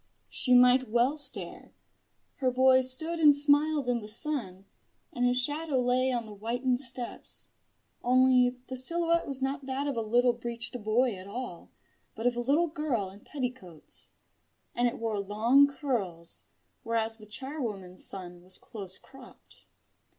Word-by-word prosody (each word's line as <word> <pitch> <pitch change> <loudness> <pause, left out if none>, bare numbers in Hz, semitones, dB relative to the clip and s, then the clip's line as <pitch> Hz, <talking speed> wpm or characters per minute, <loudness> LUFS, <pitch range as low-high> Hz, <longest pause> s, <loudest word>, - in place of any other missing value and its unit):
She 250 -1 +7
might 250 0 +4
well 240 +5 +1
stare. 285 -3 +3 0.6
Her 260 -2 0
boy 260 +1 +3
stood 315 +7 +4
and 300 -3 +5
smiled 290 -1 +3
in 240 -1 -1
the 210 - -10
sun, 215 -6 +1 0.5
and 245 - -3
his 245 0 +4
shadow 290 +1 -1
lay 250 +1 0
on 240 -2 -3
the 215 - -11
whitened 245 +4 -2
steps. 250 -2 -2 0.5
Only 255 0 +2
the 260 - -8
silhouette 335 +5 +2
was 270 -1 -4
not 270 0 -4
that 270 +2 -3
of 285 -2 -3
a 230 - -2
little 240 +3 +1
breeched 235 0 -7
boy 235 +3 0
at 185 0 -11
all, 215 -5 -8 0.5
but 225 - -7
of 245 0 +1
a - - -4
little 285 +8 +1
girl 300 - -4
in 200 - -16
petticoats; 250 - -8 0.6
and 245 0 0
it 240 - -4
wore 225 -2 -3
long 225 +8 +2
curls, 195 - -5 0.4
whereas 225 -1 -3
the 215 -1 -16
charwoman's 210 -7 -6
son 180 -2 -4
was 185 +1 -6
close 195 -4 -10
cropped. 265 -2 -17
245 Hz, 155 wpm, -27 LUFS, 220-270 Hz, 0.6 s, She